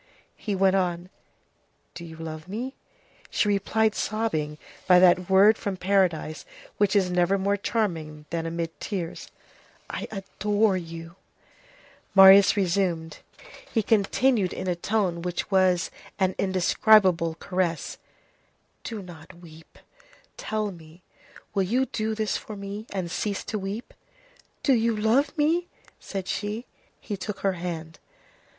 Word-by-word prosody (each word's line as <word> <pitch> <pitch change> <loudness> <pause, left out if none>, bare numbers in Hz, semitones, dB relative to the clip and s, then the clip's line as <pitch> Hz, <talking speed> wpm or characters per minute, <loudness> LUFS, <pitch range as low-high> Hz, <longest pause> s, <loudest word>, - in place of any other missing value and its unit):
He 205 -3 -3
went 190 0 +3
on:— 180 -1 -1 0.8
"Do 170 - -9
you 165 -1 -9
love 160 0 -7
me?" 240 +7 -4 0.6
She - - +1
replied, 210 +2 +1
sobbing, 160 -11 -2 0.3
by 180 -2 +7
that 180 0 +5
word 200 +3 +6
from 200 -2 -3
paradise 180 -5 0 0.4
which 205 -1 +2
is 185 -3 +3
never 180 +2 +2
more 200 +1 +1
charming 165 -8 -2
than 165 -1 -2
amid 165 0 -4
tears:— 180 -5 -5 0.6
"I - - -4
adore 205 0 0
you!" 165 0 -7 1.0
He 195 - +3
continued 220 -1 +2
in - - -5
a 180 - +1
tone 180 -2 -1
which 180 +3 -4
was 185 -2 +3 0.3
an 190 -1 +1
indescribable 185 -2 +3
caress:— 175 -1 -2 0.8
"Do 220 -4 -6
not 170 -4 -12
weep. 165 -2 -16 0.6
Tell 215 -1 -2
me, 165 0 -15 0.5
will 200 - +1
you 240 +8 +1
do 220 -2 -2
this 215 -1 -1
for 215 - -9
me, 200 +2 -7
and 185 -4 -3
cease 205 +1 -2
to 215 +1 -4
weep?" 200 +5 -6 0.7
"Do 275 - +4
you 230 -1 +2
love 270 +9 +2
me?" 330 +4 +2 0.3
said 195 -2 -6
she. 215 +4 -3 0.3
He 210 - -5
took 200 +1 -6
her 195 -1 +1
hand. 165 -2 -6
190 Hz, 130 wpm, -26 LUFS, 170-210 Hz, 1.0 s, by